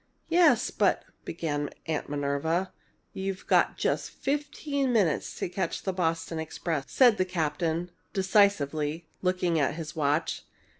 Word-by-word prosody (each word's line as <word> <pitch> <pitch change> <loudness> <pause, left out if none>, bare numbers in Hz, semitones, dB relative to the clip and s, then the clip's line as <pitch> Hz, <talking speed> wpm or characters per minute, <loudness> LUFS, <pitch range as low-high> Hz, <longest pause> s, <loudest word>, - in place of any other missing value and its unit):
"Yes, 340 0 +4
but - - +2
" - - -40
began 145 -3 -2 0.2
Aunt 155 -3 -2
Minerva. 145 +6 -1 0.4
"You've 190 0 -4
got - - +3
just - - 0
fifteen 285 -1 -2
minutes 195 -10 +1
to - - -2
catch 180 -1 -3
the 190 - -1
Boston 165 -2 -1
express," 160 -2 -3
said 245 -5 +6
the 185 - +3
captain, 170 0 -1 0.2
decisively, 170 -6 +2 0.2
looking 180 -3 +1
at 140 0 +1
his 155 -2 -6
watch. 150 +1 0
170 Hz, 135 wpm, -28 LUFS, 155-190 Hz, 0.4 s, said